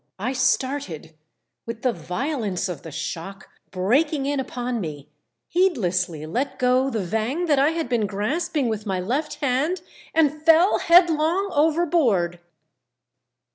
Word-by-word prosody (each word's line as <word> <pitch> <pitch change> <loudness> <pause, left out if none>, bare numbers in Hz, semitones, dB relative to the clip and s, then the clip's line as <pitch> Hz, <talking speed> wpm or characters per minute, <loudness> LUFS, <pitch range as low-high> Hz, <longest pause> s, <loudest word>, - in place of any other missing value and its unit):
I 235 +7 -2
started 260 - -1 0.5
with 230 0 -6
the 250 -2 +2
violence 200 - -3
of 180 -3 -6
the 165 - -9
shock 170 +5 -6 0.2
breaking 270 - +1
in 285 0 0
upon 245 -2 -3
me, 150 -4 -7 0.4
heedlessly 180 - 0
let 265 - -2
go 255 +1 +2
the 220 -6 -2
vang 225 - -1
that 295 -5 +3
1 290 +4 +3
had 330 -4 -2
been 235 -4 0
grasping 280 - -1
with 215 -1 -3
my 190 -2 -1
left 270 +12 -2
hand, 295 +5 -1 0.3
and 305 -1 +2
fell 330 +4 +5
headlong 340 +2 +4
overboard. 290 - +2
255 Hz, 135 wpm, -23 LUFS, 195-310 Hz, 0.5 s, fell